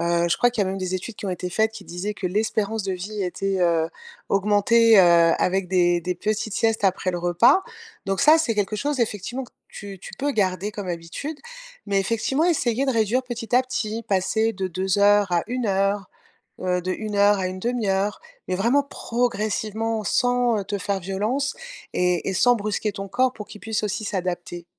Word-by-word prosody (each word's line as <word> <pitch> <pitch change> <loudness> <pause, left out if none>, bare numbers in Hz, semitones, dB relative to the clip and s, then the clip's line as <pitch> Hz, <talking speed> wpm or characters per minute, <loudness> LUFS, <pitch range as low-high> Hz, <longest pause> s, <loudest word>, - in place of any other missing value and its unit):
heu, 170 0 +1
je 170 - +2
crois 245 - +3
qu'il 225 -4 0
y - - -3
a - - -1
même 195 - -4
des 185 -1 -3
études 195 +4 -5
qui - - -6
ont 190 - -1
été 180 0 -4
faites 220 +4 +1
qui 215 -3 -10
disaient 190 +5 -4
que 185 - -3
l'espérance 215 +2 -1
de 190 - -1
vie 200 +3 -4
était, 195 +2 -2
heu, 165 -2 +2 0.4
augmentée, 210 +2 +4
heu, 170 -2 +5
avec 190 +1 +1
des 175 -2 +3
des 180 +2 -2
petites 215 +3 -2
siestes 225 -2 +1
après 190 -1 +1
le 175 - -3
repas. 205 - +4 0.4
Donc 195 0 0
ça, 305 +3 +7
c'est 240 -8 0
quelque 205 0 -1
chose 285 +3 -1
effectivement 230 +3 -2
que - - -18 0.2
tu 200 -2 -9
tu - - -10
peux 285 +1 0
garder 195 -3 0
comme 205 -2 -6
habitude, 175 - -5 0.5
mais 200 -1 +1
effectivement 230 +9 0
essayer 275 -6 +1
de 265 - +2
réduire 230 +3 +1
petit 240 -2 -4
à 255 - +5
petit, 230 -3 -3
passer 220 +4 +1
de 190 -2 -3
2 190 +2 -1
heures 205 -2 +4
à 170 -1 +2
1 250 -1 -2
heure, 195 0 0 0.5
heu, 180 -1 0
de 185 - -2
1 215 +2 -4
heure 205 0 +5
à 190 - -2
une 185 0 -6
1/2 235 -1 -1
heure, 195 +2 0 0.3
mais 185 - -1
vraiment 235 +9 +3
progressivement 225 -3 -2
sans, 245 +1 +2
heu, - - -3
te 205 0 -3
faire 195 +1 -2
violence 210 +10 -2 0.4
et 180 -1 +1
et - - -2
sans 245 +6 +4
brusquer 210 0 -2
ton 195 0 -6
corps 255 +6 +1
pour 210 - -8
qu'il 210 - -12
puisse 220 -1 -2
aussi 210 +1 -2
s'adapter. 175 -3 -4
205 Hz, 210 wpm, -23 LUFS, 185-225 Hz, 0.5 s, ça